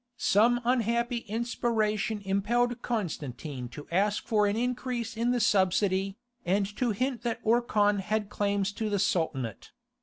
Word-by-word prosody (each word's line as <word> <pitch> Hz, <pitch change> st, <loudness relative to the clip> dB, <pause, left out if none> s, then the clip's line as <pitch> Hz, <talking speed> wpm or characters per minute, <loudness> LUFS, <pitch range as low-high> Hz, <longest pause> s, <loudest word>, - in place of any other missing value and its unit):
Some 235 Hz, +4 st, +3 dB
unhappy 235 Hz, 0 st, +1 dB
inspiration 220 Hz, -2 st, -1 dB
impelled 235 Hz, +5 st, +1 dB
Constantine 150 Hz, -, -4 dB
to 145 Hz, +5 st, -9 dB
ask 205 Hz, +4 st, +1 dB
for 210 Hz, -3 st, +2 dB
an 200 Hz, -, 0 dB
increase 245 Hz, -1 st, -2 dB
in 230 Hz, +2 st, 0 dB
the 245 Hz, 0 st, +2 dB
subsidy, 195 Hz, -1 st, +2 dB, 0.3 s
and 195 Hz, +3 st, +1 dB
to 250 Hz, -, +1 dB
hint 250 Hz, +3 st, -1 dB
that 235 Hz, -1 st, -2 dB
Orkhan 215 Hz, -3 st, +3 dB
had 210 Hz, +1 st, -1 dB
claims 200 Hz, -1 st, 0 dB
to 215 Hz, +1 st, -3 dB
the 205 Hz, -, +1 dB
Sultanate. 145 Hz, -, -1 dB
210 Hz, 140 wpm, -29 LUFS, 195-235 Hz, 0.3 s, Some